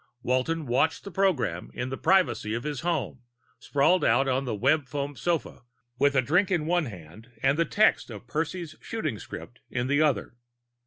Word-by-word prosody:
Walton 140 +6 0
watched 125 0 +1
the 200 - -8
program 155 - 0
in 125 +1 -3
the 130 - -3
privacy 180 - +2
of 120 - -4
his 150 -3 -3
home, 155 -7 -2 0.4
sprawled 155 +6 +2
out 130 +4 +3
on 135 +1 0
the 115 -4 -2
foamweb 140 +2 0
sofa 165 +7 -2 0.4
with 140 0 +3
a 130 - +4
drink 180 +9 +2
in 170 -5 0
one 175 0 +1
hand 95 +3 -11
and 135 +1 +4
the 170 +2 +2
text 210 -6 +2
of 110 0 -9
Percy's 160 +3 -3
shooting 155 - -3
script 120 - -9
in 125 -1 -2
the 145 +3 +2
other. 150 -6 +1
140 Hz, 175 wpm, -27 LUFS, 125-165 Hz, 0.4 s, a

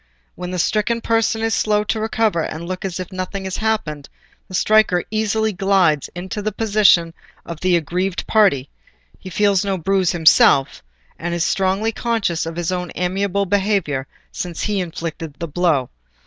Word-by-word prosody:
When 180 0 -6
the 180 - -4
stricken 215 +6 +1
person 225 -1 +1
is 225 0 +1
slow 210 0 +1
to 220 +1 -2
recover 220 -5 0
and 160 +2 -5
look 185 0 -5
as 185 -1 -4
if 185 - -6
nothing 185 +1 -4
had 190 -1 -4
happened, 210 -10 -2 0.4
the 185 - -7
striker 210 -3 +3
easily 220 0 0
glides 185 -6 +2
into 190 +4 -5
the 215 +1 -2
position 200 -6 +3 0.3
of 170 -2 -7
the 185 0 +2
aggrieved 180 +4 -2
party; 195 - +3 0.5
he 185 - -9
feels 200 +1 +2
no 195 -1 -1
bruise 185 +1 +1
himself, 155 - +4 0.4
and 170 0 -3
is 170 - 0
strongly 195 +3 +1
conscious 220 -8 -1
of 165 - -5
his 175 +1 -2
own 180 -2 -3
amiable 195 +2 0
behaviour 190 -9 0 0.2
since 175 -3 -5
he 210 -2 0
inflicted 165 -3 -5
the 170 - -5
blow. 155 -5 +1
185 Hz, 165 wpm, -20 LUFS, 170-210 Hz, 0.5 s, himself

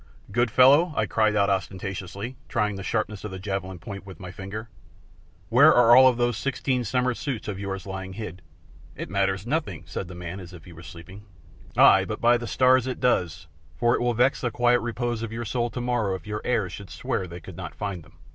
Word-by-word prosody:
"Good 120 +3 +2
fellow," 140 +9 +5
I 105 - +1
cried 110 0 +1
out 100 -1 +3
ostentatiously, 95 +4 -4
trying 105 -1 0
the 95 - -6
sharpness 105 0 -2
of 105 - -4
the 95 - -7
javelin 95 -1 -4
point 100 +3 -8
with 95 -2 -12
my 90 -1 -8
finger, 105 +4 -7 0.8
"where - - +7
are 120 -1 +6
all 130 0 +9
of 125 -2 +3
those 120 -2 +1
sixteen 130 -2 -1
summer 125 +2 0
suits 125 -2 -4
of 100 -2 -4
yours 95 -1 -5
lying 95 -1 -6
hid?" 95 -4 -7 0.5
"It - - -7
matters 95 0 0
nothing," 120 - -2
said 80 +4 -5
the 90 - -9
man, 90 +2 -6
as 90 -1 -11
if 85 -3 -12
he 90 - -12
were 80 - -13
asleep. 85 0 -11 0.7
"Ay, - - +7
but - - -5
by 120 +1 +4
the 120 - -6
stars 130 0 +3
it 130 - -4
does, 85 -8 0 0.3
for 120 +8 +3
it - - 0
will 120 -1 +1
vex 125 +4 +2
the 125 - 0
quiet 120 +1 +3
repose 120 0 -3
of 115 -1 -4
your 115 +1 -4
soul 120 +1 -1
tomorrow 120 -5 -1
if 90 - -9
your 105 0 -4
heirs 110 -8 0
should 100 -1 -9
swear 115 -8 -3
they 85 +1 -8
could 90 +1 -11
not 90 -2 -7
find 100 -4 -4
them." - - -21
105 Hz, 220 wpm, -25 LUFS, 95-120 Hz, 0.8 s, all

